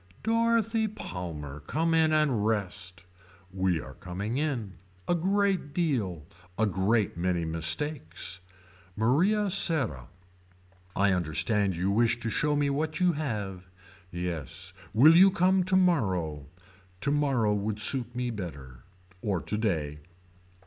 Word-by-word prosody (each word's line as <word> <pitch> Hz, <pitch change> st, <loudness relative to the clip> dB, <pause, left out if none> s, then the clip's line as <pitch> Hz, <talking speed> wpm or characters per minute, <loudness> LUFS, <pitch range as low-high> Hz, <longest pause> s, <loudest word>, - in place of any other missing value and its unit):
Dorothy 225 Hz, -1 st, +2 dB
Palmer 85 Hz, -, -6 dB
Come 160 Hz, -, -1 dB
in 160 Hz, -1 st, +4 dB
and 150 Hz, -9 st, +2 dB
rest. 95 Hz, -4 st, -2 dB, 0.5 s
We 95 Hz, -3 st, +1 dB
are 65 Hz, -, -9 dB
coming 100 Hz, -, -4 dB
in. 125 Hz, -10 st, -2 dB, 0.3 s
A -, -, +2 dB
great 190 Hz, -3 st, 0 dB
deal. 110 Hz, -, -1 dB, 0.3 s
A 110 Hz, -, +3 dB
great 100 Hz, +1 st, +1 dB
many 85 Hz, -1 st, 0 dB
mistakes. 85 Hz, -, -3 dB, 0.6 s
Maria 185 Hz, -, +2 dB
Serra. 130 Hz, -, +1 dB, 0.9 s
I 100 Hz, 0 st, +3 dB
understand 95 Hz, +3 st, 0 dB
you 90 Hz, +3 st, 0 dB
wish 115 Hz, +3 st, +2 dB
to 115 Hz, -2 st, -2 dB
show 150 Hz, +5 st, +1 dB
me 145 Hz, 0 st, +1 dB
what 155 Hz, +4 st, -2 dB
you 180 Hz, -1 st, +4 dB
have. 105 Hz, -, -4 dB, 0.4 s
Yes. 85 Hz, -5 st, -5 dB, 0.2 s
Will 140 Hz, +10 st, +7 dB
you 190 Hz, +3 st, +8 dB
come 185 Hz, 0 st, +2 dB
tomorrow. 105 Hz, -, +1 dB, 0.5 s
Tomorrow 135 Hz, -5 st, +1 dB
would 105 Hz, +1 st, -2 dB
suit 120 Hz, +1 st, +2 dB
me 125 Hz, -1 st, -2 dB
better. 70 Hz, -, -8 dB, 0.4 s
Or 100 Hz, -5 st, -1 dB
today. 80 Hz, -9 st, -2 dB
110 Hz, 120 wpm, -28 LUFS, -, 0.9 s, you